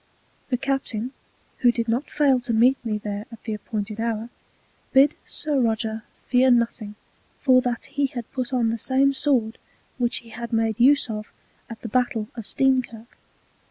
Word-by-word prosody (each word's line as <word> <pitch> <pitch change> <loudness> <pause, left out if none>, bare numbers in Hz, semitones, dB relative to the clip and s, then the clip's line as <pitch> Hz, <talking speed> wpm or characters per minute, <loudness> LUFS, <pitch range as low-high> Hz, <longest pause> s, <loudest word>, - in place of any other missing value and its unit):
] - - -38
The 250 - +1
Captain, 260 -2 -2 0.5
who 245 - +5
did 230 -1 -2
not 240 +6 -1
fail 280 -4 +3
to 245 -1 -2
meet 245 +4 +4
me 220 -2 -1
there 210 0 -5
at 230 - -12
the 220 - -3
appointed 215 0 -4
Hour, 230 0 -2 0.6
bid 275 +3 +6
Sir 295 -3 0
Roger 220 -2 -1 0.2
fear 255 +1 +3
nothing, 235 -3 +1 0.4
for 255 -2 +5
that 245 -1 -2
he 280 0 -1
had 240 -3 -7
put 255 -1 -3
on 240 -3 +2
the 230 0 -2
same 270 +4 +2
Sword 255 -5 +1 0.4
which 240 -1 +1
he 230 - -13 0.2
made 225 -1 0
use 280 +3 +5
of 215 -2 -6 0.4
at 230 - -9
the - - -4
Battel 240 -2 0
of 230 -3 -8
_Steenkirk. 255 -3 +1
240 Hz, 170 wpm, -24 LUFS, 225-260 Hz, 0.6 s, bid